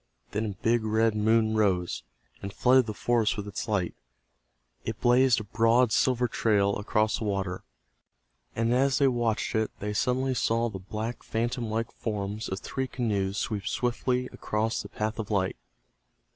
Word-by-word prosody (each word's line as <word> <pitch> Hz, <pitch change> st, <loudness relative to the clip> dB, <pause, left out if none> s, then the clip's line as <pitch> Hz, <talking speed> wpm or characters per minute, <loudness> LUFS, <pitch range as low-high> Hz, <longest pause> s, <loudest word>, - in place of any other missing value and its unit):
Then 105 Hz, +2 st, -1 dB
a 100 Hz, 0 st, -8 dB
big 115 Hz, 0 st, +3 dB
red 110 Hz, +1 st, +2 dB
moon 110 Hz, +1 st, +3 dB
rose, 90 Hz, -, +1 dB, 0.4 s
and 100 Hz, -, -5 dB
flooded 125 Hz, +3 st, +4 dB
the 110 Hz, -, -3 dB
forest 115 Hz, -2 st, +1 dB
with 105 Hz, 0 st, -4 dB
its 100 Hz, -, -5 dB
light. 100 Hz, -5 st, 0 dB, 0.9 s
It -, -, -4 dB
blazed 125 Hz, 0 st, +4 dB
a -, -, -5 dB
broad 115 Hz, +3 st, +3 dB
silver 125 Hz, 0 st, +2 dB
trail 100 Hz, -3 st, +2 dB
across 110 Hz, +1 st, +1 dB
the -, -, -4 dB
water, 95 Hz, -3 st, -2 dB, 0.9 s
and 115 Hz, +1 st, +1 dB
as 135 Hz, +1 st, +3 dB
they 140 Hz, -2 st, +4 dB
watched 120 Hz, -4 st, 0 dB
it 110 Hz, -1 st, +1 dB
they 105 Hz, +1 st, -3 dB
suddenly 130 Hz, +5 st, +1 dB
saw 115 Hz, 0 st, +1 dB
the 95 Hz, -3 st, -7 dB
black 110 Hz, +5 st, -5 dB
phantom 115 Hz, +1 st, -2 dB
like 115 Hz, +2 st, -2 dB
forms 105 Hz, 0 st, -4 dB
of 95 Hz, -, -4 dB
three 130 Hz, -1 st, -3 dB
canoes 100 Hz, -6 st, -1 dB
sweep 105 Hz, -4 st, -2 dB
swiftly 125 Hz, +1 st, 0 dB
across 110 Hz, +2 st, -1 dB
the -, -, -9 dB
path 110 Hz, +1 st, -3 dB
of 105 Hz, -, -4 dB
light. 95 Hz, -, 0 dB
110 Hz, 165 wpm, -28 LUFS, 105-120 Hz, 0.9 s, flooded